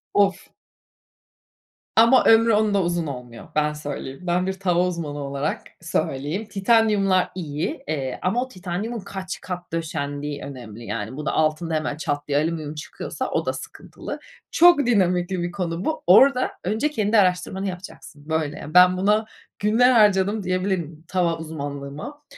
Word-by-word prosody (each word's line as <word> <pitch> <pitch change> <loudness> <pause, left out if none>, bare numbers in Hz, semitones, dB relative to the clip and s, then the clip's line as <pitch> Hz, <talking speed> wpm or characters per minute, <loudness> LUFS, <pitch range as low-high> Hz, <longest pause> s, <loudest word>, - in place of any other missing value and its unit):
Of. 200 -1 +2 1.4
Ama 230 +3 +6
ömrü 225 0 +6
onda 210 -2 +3
uzun 170 -2 -1
olmuyor. 125 -3 -8
Ben 150 0 +2
söyleyeyim. 145 -2 -6
Ben 180 +1 0
bir 190 - 0
tava 180 -2 +1
uzmanı 155 -5 -4
olarak 140 +1 -3 0.2
söyleyeyim. 160 +4 -2
Titanyumlar 205 -2 +2
iyi, 155 -3 -4
eee, 135 -4 -3
ama 235 +7 +1
o - - -8
titanyumun 200 +2 -4
kaç 190 -1 -6
kat 180 -2 -6
döşendiği 145 -3 -3
önemli 120 -5 -9
yani 110 +5 -4
bunun 150 - -5
altında 155 +1 0
hemen 155 -2 -1
çat 145 -2 -3
diye 145 0 +1
alüminyum 155 -1 -2
çıkıyorsa 150 - -5
o - - 0
da - - 0
sıkıntılı. - - -8 0.3
Çok 345 -2 +6
dinamikli 185 -5 +1
bir 175 0 -2
konu 175 -2 -3
bu. 315 - -2
Orada 255 +7 +6
önce 220 +10 0
kendi 220 -6 +1
araştırmanı 190 0 +1
yapacaksın. 175 -5 -9
Böyle, 155 -2 -1
yani, 150 - -9
ben 180 0 +7
buna 210 +3 +2 0.3
günler 230 +5 +4
harcadım 205 -2 +3
diyebilirim 180 -4 -2
tava 175 -3 0
uzmanlığıma. 150 - -7
175 Hz, 145 wpm, -23 LUFS, 150-200 Hz, 1.4 s, ben